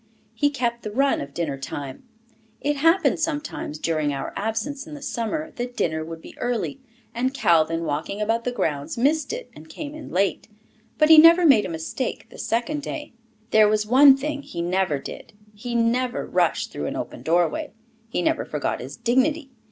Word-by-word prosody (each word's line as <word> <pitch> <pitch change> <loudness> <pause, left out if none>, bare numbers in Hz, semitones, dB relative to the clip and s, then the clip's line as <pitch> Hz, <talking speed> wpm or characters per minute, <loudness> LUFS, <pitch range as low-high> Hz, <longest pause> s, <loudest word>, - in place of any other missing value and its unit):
He 290 +6 +2
kept 240 -4 -2
the 215 - -5
run 275 +6 +1
of 140 - -7
dinner 145 -3 -3
time. 135 0 -6 0.6
It 290 0 -1
happened 330 +6 +3
sometimes, 295 - -3
during 155 -2 0
our 135 -1 -4
absence 225 +8 -3
in 305 - -8
the 290 - -10
summer, 280 +5 -3
that 245 0 -5
dinner 160 -1 0
would 165 0 -8
be - - -12
early, 245 +3 -2 0.3
and 255 +3 -1
Calvin 165 - +2
walking 155 +6 -3
about 225 +2 0
the 250 - -1
grounds, 150 -11 -2
missed 290 +4 +1
it 485 +2 -6
and 155 +1 -13
came 290 - -7
in 310 -1 -9
late. 195 +2 0 0.5
But 305 0 +4
he 320 -1 +10
never 335 +2 +8
made 245 -11 +5
a - - -8
mistake 165 +10 -4
the - - -12
second 240 +6 -1
day. 295 -1 -6 0.4
There 215 -1 +6
was 210 0 +1
one 270 +4 +7
thing 290 +1 -3
he 175 - -8
never 175 -3 0
did, 135 - -9 0.2
he 235 +3 -6
never 240 +2 +1
rushed - - 0
through - - -4
an - - -4
open - - -6
doorway. 175 - +1 0.4
He 180 - -1
never - - +1
forgot 150 -1 -3
his 135 +3 -8
dignity. 265 +5 +1
235 Hz, 185 wpm, -24 LUFS, -, 0.6 s, he